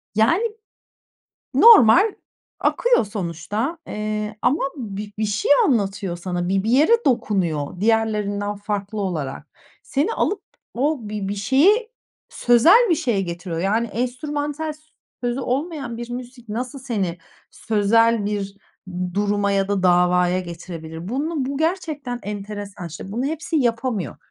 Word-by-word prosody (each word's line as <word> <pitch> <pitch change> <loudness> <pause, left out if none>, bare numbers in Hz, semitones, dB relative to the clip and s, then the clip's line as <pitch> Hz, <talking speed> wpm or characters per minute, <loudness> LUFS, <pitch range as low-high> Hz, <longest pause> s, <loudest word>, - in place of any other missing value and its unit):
Yani, 230 - +3 1.1
normal 410 - +7 0.5
akıyor 485 - +3
sonuçta. 205 - -3
Eee, 210 0 -3
ama 270 +6 +2 0.2
bir 210 -4 -6
bir 215 - +1
şey 210 +4 -1 0.2
anlatıyor 200 -7 0
sana, 175 0 -3
bir 190 0 +1
bir 220 - 0
yere 320 - +4
dokunuyor 185 - 0
diğerlerinden 210 -2 0
farklı 205 0 -4
olarak. 155 -9 -3 0.4
Seni 295 +11 0
alıp 410 - 0 0.3
o 290 +5 +1
bir 205 -2 -4
bir 200 - -2
şeye, 350 - +3 0.4
sözel 330 - +5
bir - - +5
şeye 240 -9 0
getiriyor. 170 -2 -4
Yani, 215 +5 +1
enstrümantal, 290 +6 -3
s 305 - -18 0.4
sözü 245 +2 -1
olmayan 270 -2 -3
bir 240 +1 -7
müzik 245 -1 -8
nasıl 250 +6 -4
seni 205 -10 -2 0.3
sözel 225 +1 +2
bir 200 -1 -3 0.6
duruma 205 0 +1
ya 195 0 +1
da 200 -2 0
davaya 180 0 +3
getirebilir? 170 -1 -8
Bunu 285 +4 -1
bu 275 +1 -3
gerçekten 310 -7 -2
enteresan. 205 -2 -6
İşte, 170 +5 -8
bunu 240 +4 -2
hepsi 315 +2 -2
yapamıyor. 230 - -1
215 Hz, 130 wpm, -22 LUFS, 195-270 Hz, 1.1 s, normal